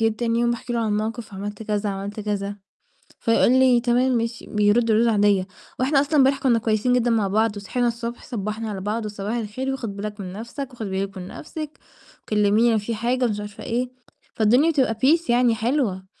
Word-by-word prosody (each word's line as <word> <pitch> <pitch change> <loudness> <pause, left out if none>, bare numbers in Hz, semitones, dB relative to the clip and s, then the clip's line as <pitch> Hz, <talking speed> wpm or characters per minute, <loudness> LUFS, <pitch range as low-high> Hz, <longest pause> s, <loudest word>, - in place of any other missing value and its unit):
جيت 225 -1 +1
تاني 230 -1 0
يوم 240 - +2
باحكي 240 +1 -4
له 235 - 0
عن 220 - 0
الموقِف 215 0 -3
عملت 205 +2 -6
كذا، 210 -1 -1
عملت 200 +2 -5
كذا، 205 -1 -3 0.6
فيقُول 230 +1 +3
لي: 260 -2 +5
"تمام 250 +2 +2
ماشي" 230 0 -3
بيرُد 210 +2 +2
ردود 230 +2 +4
عادية، 205 -3 +3 0.3
وإحنا 275 +2 +3
أصلًا 295 +2 -1
امبارح 270 -1 +4
كنّا 240 -4 +3
كويسين 220 +3 +1
جدًا 245 -1 +2
مع 220 -4 +2
بعض 215 +1 +1
وصحينا 240 +5 -1
الصبح 235 0 -4
صبّحنا 215 -1 -4
على 195 -2 -5
بعض 215 +2 -2
"وصباح 210 +2 -4
الخير 240 +4 -3
وخُد 230 -7 -5
بالك 205 +1 -6
من 185 -1 -6
نَفْسك." 240 +6 -6
"وخُدي 220 -4 -5
بالِك 195 +1 -3
من 180 0 -7
نَفْسِك، 305 +4 -8 0.4
وكلّميني 215 +2 +3
لو 220 - +3
في 215 +2 -3
حاجة،" 245 +3 0
مش 210 -3 -1
عارفة 205 0 -8
إيه، 245 +1 -1 0.5
فالدنيا 245 +9 +4
بتبقى 265 -6 +2
peace 320 +3 +3
يعني 240 -1 +4
حلوة، 225 -6 -1
225 Hz, 195 wpm, -23 LUFS, 205-245 Hz, 0.6 s, لي